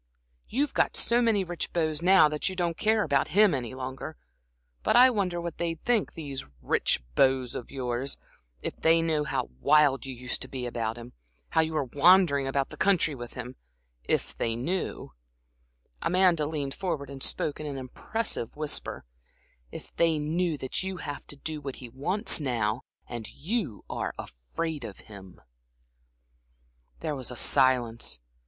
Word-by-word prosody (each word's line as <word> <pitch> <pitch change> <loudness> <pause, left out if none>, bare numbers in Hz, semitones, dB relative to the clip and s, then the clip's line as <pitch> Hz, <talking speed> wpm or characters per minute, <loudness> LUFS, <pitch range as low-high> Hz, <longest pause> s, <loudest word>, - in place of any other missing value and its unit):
You've 280 +5 0
got - - +1
so 240 +1 +3
many 220 -4 +3
rich 175 -2 -4
beaux 160 -2 +1
now 185 -2 +7
that 150 +4 -1
you 190 - -6
don't 175 -2 0
care 215 +2 +2
about 140 -5 +2
him 210 -4 +7
any 130 -2 -3
longer. 130 +4 -6 0.6
But - - +2
I 255 +2 +8
wonder 185 -6 0
what 170 -1 -5
they'd 165 -1 -1
think 240 -4 +2
these 140 -5 -5 0.2
rich 65 - +1
beaux 130 - +4
of 120 - -6
yours 130 0 -2 0.5
if - - -3
they 165 0 +4
knew 155 -2 +1
how 65 - -2
wild 140 - +4
you 130 - -5
used 125 +1 -2
to - - -3
be 130 -2 -5
about 115 -1 -2
him, 120 +1 -10 0.4
how 160 - +3
you 160 0 -1
went 135 -5 -2
wandering 150 -3 +5
about 135 0 0
the - - -10
country 185 -6 +3
with 120 -3 -8
him, 125 +2 -7 0.5
if - - -1
they 115 -1 -1
knew" 170 +11 -3 0.9
Amanda 175 -4 +3
leaned 145 -3 -3
forward 155 -8 -3
and 135 -1 -8
spoke 150 - -1
in 155 - -4
an 140 -2 -4
impressive 130 - -2
whisper 150 - -3 0.7
"if - - -10
they 165 -2 +3
knew 160 +2 0
that 130 -2 -3
you 190 0 -4
have 145 -4 -6
to - - -6
do 155 +1 -5
what 135 -2 -5
he 125 - -10
wants 175 - 0
now, 120 -4 0 0.3
that 120 -3 -6
you're 170 - -3 0.3
afraid 90 - -5
of 105 -4 -8
him." 100 -4 -12 1.6
There 155 -2 -2
was 130 -3 -2
a 125 - -5
silence. 120 - +2
150 Hz, 165 wpm, -28 LUFS, 130-175 Hz, 1.6 s, I